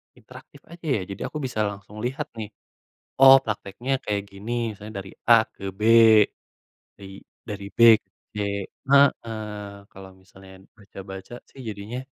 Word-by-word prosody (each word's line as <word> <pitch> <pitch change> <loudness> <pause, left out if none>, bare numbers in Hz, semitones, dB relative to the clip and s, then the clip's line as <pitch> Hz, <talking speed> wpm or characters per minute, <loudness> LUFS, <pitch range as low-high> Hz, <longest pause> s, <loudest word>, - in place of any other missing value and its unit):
interaktif - - -16
aja 170 -1 -13
ya, 100 - -2
jadi 100 - -8
aku 150 - -7
bisa 120 -4 -4
langsung 100 +1 -9
lihat 130 +2 -4
nih. 105 - -4 0.8
Oh 135 0 +10
prakteknya 110 +4 -4
kayak 100 -1 -2
gini, 100 +4 -7 0.2
misalnya 105 +2 -11
dari 95 -1 -9 0.2
A 115 -1 +7
ke 100 -1 -6
B. 100 +3 -12 1.2
I 95 0 -11 0.3
dari 100 -1 -6
B - - -9 0.2
ke - - -48 0.2
C - - -59 0.5
heeh, 135 -5 +3 0.5
kalau 95 0 -12
misalnya 95 0 -17 0.2
baca-baca 95 +1 -10 0.2
sih 135 - -14
jadinya, 105 +4 -6
105 Hz, 145 wpm, -24 LUFS, 95-115 Hz, 1.2 s, Oh